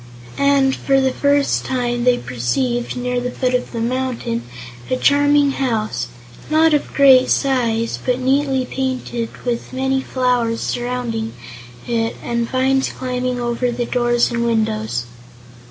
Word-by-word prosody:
And, 280 -1 +3
for 270 -1 +2
the 265 -1 +2
first 285 0 +2
time, 240 -2 -1
they 250 -1 +4
perceived, 125 - -2
near 250 0 -1
the 250 - -2
foot 250 0 -1
of 250 - -1
the 235 - -4
mountain, 245 - -2 0.5
a - - +1
charming 285 - +4
house, 230 -6 -1 0.4
not 315 +1 +4
of 295 - 0
great 265 -2 +6
size 235 -4 +1
but 250 -1 +1
neatly 265 0 +1
painted 255 -3 -3
and - - -17
with 240 -1 -2
many 265 +1 0
flowers 250 -3 0
surrounding 240 -2 -3 0.5
it 230 -1 -1
and 235 -1 -1
vines 265 +1 +1
climbing 250 -1 -3
over 240 +1 -1
the 240 0 -2
doors 240 -1 +1
and 235 0 -1
windows. 120 - -1
250 Hz, 140 wpm, -19 LUFS, 235-265 Hz, 0.5 s, great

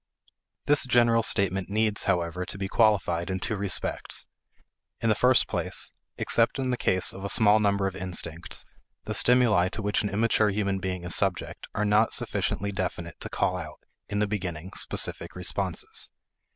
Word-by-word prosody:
This 145 -2 +4
general 120 -2 +4
statement 95 -4 0
needs, 110 0 0
however, 90 -1 0
to 95 - -6
be 95 0 -3
qualified 95 -6 +2
in 95 0 -2
two 110 - -2
respects. 100 -2 -3 0.7
In 115 - 0
the - - +5
first 125 +4 +4
place, - - -3 0.3
except 115 +3 +2
in 130 -1 -1
the - - +1
case 95 -6 0
of 95 - -9
a 100 - -2
small 110 0 +5
number 100 -2 +1
of 95 -1 -2
instincts, 85 -3 -4 0.4
the - - -4
stimuli 115 -8 +4
to 110 +3 -5
which 105 0 +1
an 105 - -2
immature 110 +1 +2
human 100 -1 -1
being 90 -1 -4
is 90 - +1
subject 95 -3 0
are 105 - 0
not 105 +2 +3
sufficiently 100 +3 -1
definite 85 -3 -4
to - - -4
call 90 - 0
out, 80 -4 -7 0.3
in 100 - -2
the 105 - +2
beginning, 95 -4 -4
specific - - -1
responses. - - -2
100 Hz, 170 wpm, -27 LUFS, 90-110 Hz, 0.7 s, the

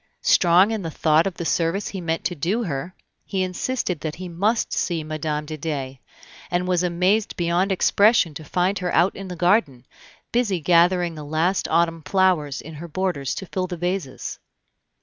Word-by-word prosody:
Strong 180 +4 +5
in 220 -2 -2
the 165 - -4
thought 160 +2 +2
of 190 - -4
the 170 - -5
service 170 +5 0
he 190 - -6
meant 165 -1 -2
to 180 - -1
do 185 +9 -1
her, 170 0 -4 0.3
he 190 -2 -2
insisted 185 - -2
that 155 0 -4
he 185 +1 -7
must 200 +7 0
see 170 -3 -1
Mme. 155 -1 -3
de 155 +1 -6
Dey, 135 -4 -4 0.5
and 180 0 0
was 180 -1 +2
amazed 180 +4 +1
beyond 175 +3 +1
expression 200 -2 +3
to 155 - -8
find 180 +5 0
her 180 -1 -2
out 175 +4 +3
in 195 0 -7
the 180 - -6
garden, 175 - +1 0.5
busy 225 -7 +1
gathering 175 +1 +3
the 155 -2 -8
last 160 +6 0
autumn 165 0 +1
flowers 180 -6 +1
in 160 - -10
her 160 +3 -8
borders 170 -5 -2
to 190 - -6
fill 185 0 -3
the 175 -1 -5
vases. 175 -5 -3
175 Hz, 185 wpm, -23 LUFS, 160-190 Hz, 0.5 s, Strong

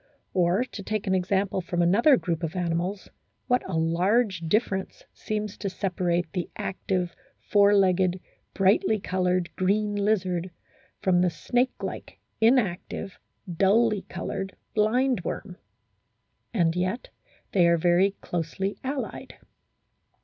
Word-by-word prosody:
Or 180 +5 +2
to 235 -5 -8
take 215 +1 -3
an 190 - +1
example 190 +1 0
from 175 0 -1
another 235 - +5
group 170 -5 -2
of 165 +1 -3
animals 180 +2 -2 0.4
what 250 0 +2
a 175 - -1
large 185 +5 +2
difference 190 +3 -1
seems 210 -1 -4
to 200 - -2
separate 180 -3 -1
the 180 - -3
active, 180 -2 -2 0.2
four 205 0 +4
legged, 185 -1 +2 0.4
brightly 205 +2 +3
coloured, 180 -2 -1
green 205 +3 +1
lizard 190 -4 0 0.5
from 180 -2 +3
the 180 - +3
snake 245 +8 -1
like, - - -6 0.2
inactive, 205 -4 +1 0.4
dully 210 +2 +3
coloured 195 0 -4 0.2
blindworm, 215 -4 0 0.9
and 170 -6 +1
yet 185 +7 -2 0.4
they 175 -3 +4
are 170 0 +4
very 180 +4 +3
closely 175 +4 -3
allied. 270 +1 -5
190 Hz, 120 wpm, -26 LUFS, 175-210 Hz, 0.9 s, another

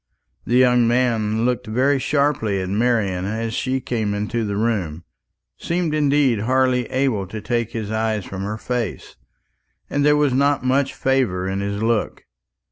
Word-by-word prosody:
This 120 - 0
young 125 -2 +4
man 115 -2 +1
looked 125 -3 -1
very 130 +5 +2
sharply 140 -9 0
at 95 0 -3
Marian 105 -4 +1
as 110 +2 -3
she 130 +3 -1
came 110 -5 -2
into 105 +3 -2
the 100 -2 -2
room 100 -8 -1 0.6
seemed 170 -2 -1
indeed 145 -5 +2
hardly 125 +1 +1
able 130 -8 0
to 110 +4 -6
take 115 0 -2
his 110 -2 -4
eyes 110 -2 -1
from 95 0 -6
her 105 +2 -3
face 120 -3 -4 0.8
and 145 - +1
there 150 0 +4
was 145 -3 +2
not 140 0 +2
much 135 +1 +1
favour 120 -9 0
in 95 +1 -2
his 100 +1 -3
look. 115 -1 -1
115 Hz, 160 wpm, -21 LUFS, 105-130 Hz, 0.8 s, young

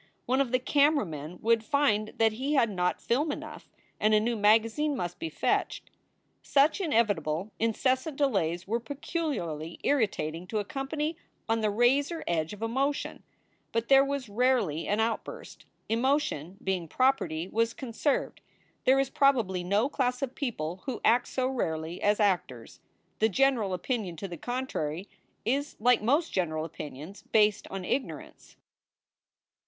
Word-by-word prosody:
one 260 +2 +2
of 260 -4 -1
the 255 - +4
camera 285 +2 +3
men 155 +1 -7
would 230 0 +3
find 245 -6 +2
that 225 -1 +4
he 265 +7 -2
had 230 -5 +3
not 180 -2 0
film 290 +6 0
enough - - -8 0.3
and 215 0 +4
a - - +5
new 235 +2 0
magazine 225 +8 +3
must 175 -5 -4
be 330 - -3
fetched. - - -1 0.5
Such 290 +7 +3
inevitable, 205 - 0
incessant 260 +6 0
delays 185 - 0
were 230 +3 0
peculiarly 235 - -4
irritat 210 - +1
ing 170 +3 -8
to 220 - -3
a 205 - -1
company 300 +6 -3 0.3
on 225 0 +1
the 215 - +2
razor 270 +9 +2
edge 160 -2 0
of 210 +1 -7
emotion, 270 +5 -1 0.5
but 230 0 -1
there 270 0 +7
was 275 -2 -3
rarely 210 - +1
an 205 +2 +1
outburst. 225 0 -3 0.2
Emotion, 230 - 0
being 185 -3 -1
property, 180 - +1
was 230 +3 0
conserved. 265 +2 -2 0.4
There 265 +1 +5
is 270 -1 0
probably 230 -10 +2
no 200 +7 +2
class 250 -3 -1
of 260 -1 -3
people 185 - -4
who 255 -4 -3
act 240 +2 +4
so 255 - -1
rarely 165 -9 -3
as 205 +1 +2
actors. 175 - -1 0.4
The 220 - +4
general 245 -3 +2
opinion 190 -1 -2
to 195 - -6
the 175 - -7
contrary 200 - -3 0.4
is 280 +5 -1
like 245 +1 +4
most 290 +9 +1
general 155 -4 -1
opinions 155 +4 -8
based 210 -1 +3
on 195 -1 -5
ignorance. 260 +6 -4
225 Hz, 150 wpm, -29 LUFS, 185-270 Hz, 0.5 s, there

